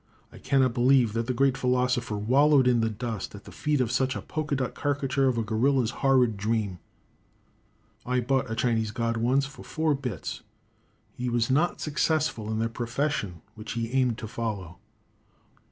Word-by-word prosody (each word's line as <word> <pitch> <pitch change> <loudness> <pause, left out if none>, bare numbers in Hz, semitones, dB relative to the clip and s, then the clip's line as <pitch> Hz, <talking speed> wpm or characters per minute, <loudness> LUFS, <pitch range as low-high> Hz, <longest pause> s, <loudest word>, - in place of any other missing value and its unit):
I - - -13
cannot 130 -3 +2
believe 125 -2 +4
that 115 0 -2
the 130 - 0
great 135 +1 +3
philosopher 125 -3 0
wallowed 135 +5 +4
in 120 -2 +3
the 115 - +1
dust 110 -2 -5
at 100 - -11
the - - -12
feet 150 -2 -1
of 125 -3 +1
such 130 +1 +1
a - - -4
polka 155 -2 -2
dot 130 -2 -2
carricature 140 -1 0
of 125 -2 +1
a 115 - +1
gorilla's 120 +2 +1
horrid 130 -5 +3
dream. 105 -3 -1 1.2
I 125 0 0
bought 130 +1 0
a 110 - -2
Chinese 115 -1 +1
god 115 +2 -1
once, 130 +4 +2
for 140 +1 -11
four 160 -1 0
bits. 125 - -5 0.7
He 125 0 -4
was 120 +1 +1
not 155 +6 +1
successful 150 -7 0
in 110 - -1
the 115 +1 +1
profession 115 - -3
which 110 -1 -7
he 115 0 -3
aimed 125 -3 +1
to 115 - -6
follow. 105 -7 -5
125 Hz, 175 wpm, -27 LUFS, 115-135 Hz, 1.2 s, believe